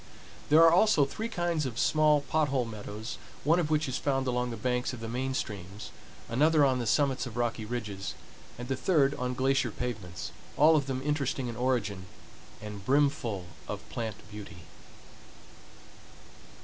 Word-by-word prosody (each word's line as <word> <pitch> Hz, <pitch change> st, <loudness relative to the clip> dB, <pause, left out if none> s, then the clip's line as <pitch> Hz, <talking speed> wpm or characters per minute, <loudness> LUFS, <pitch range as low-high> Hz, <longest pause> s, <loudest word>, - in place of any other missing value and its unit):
There 155 Hz, +2 st, +7 dB
are 165 Hz, -, +8 dB
also 180 Hz, -6 st, +5 dB
three 220 Hz, +11 st, -4 dB
kinds 175 Hz, -7 st, 0 dB
of 120 Hz, -2 st, -7 dB
small 150 Hz, 0 st, +4 dB
pot 155 Hz, +2 st, +1 dB
hole 135 Hz, -3 st, 0 dB
meadows 110 Hz, 0 st, -7 dB, 0.2 s
one 165 Hz, +5 st, +4 dB
of 160 Hz, -4 st, 0 dB
which 155 Hz, -1 st, +1 dB
is 130 Hz, -, -2 dB
found 135 Hz, -2 st, 0 dB
along 125 Hz, -1 st, 0 dB
the 115 Hz, -, -5 dB
banks 125 Hz, +3 st, -1 dB
of 125 Hz, -, -7 dB
the 115 Hz, -, -5 dB
main 130 Hz, +3 st, -2 dB
streams, 100 Hz, -3 st, -5 dB, 0.4 s
another 150 Hz, +5 st, +4 dB
on 130 Hz, -2 st, +2 dB
the 120 Hz, -, -2 dB
summits 135 Hz, 0 st, +2 dB
of 120 Hz, -1 st, -8 dB
rocky 120 Hz, -2 st, -1 dB
ridges, 105 Hz, -4 st, -4 dB, 0.4 s
and 120 Hz, +1 st, -6 dB
the 135 Hz, -, 0 dB
third 140 Hz, -1 st, +3 dB
on 125 Hz, -2 st, -3 dB
glacier 135 Hz, -1 st, +2 dB
pavements, 100 Hz, -7 st, -5 dB, 0.3 s
all 160 Hz, +2 st, +7 dB
of 145 Hz, -3 st, +1 dB
them 130 Hz, -1 st, -3 dB
interesting 140 Hz, -4 st, -1 dB
in 115 Hz, -, -6 dB
origin 110 Hz, -7 st, -1 dB, 0.6 s
and 105 Hz, -2 st, -7 dB
brimful 135 Hz, -6 st, +1 dB, 0.2 s
of 105 Hz, +1 st, -6 dB
plant 110 Hz, -1 st, -3 dB, 0.2 s
beauty. 95 Hz, -5 st, -9 dB
125 Hz, 165 wpm, -29 LUFS, 110-145 Hz, 0.6 s, are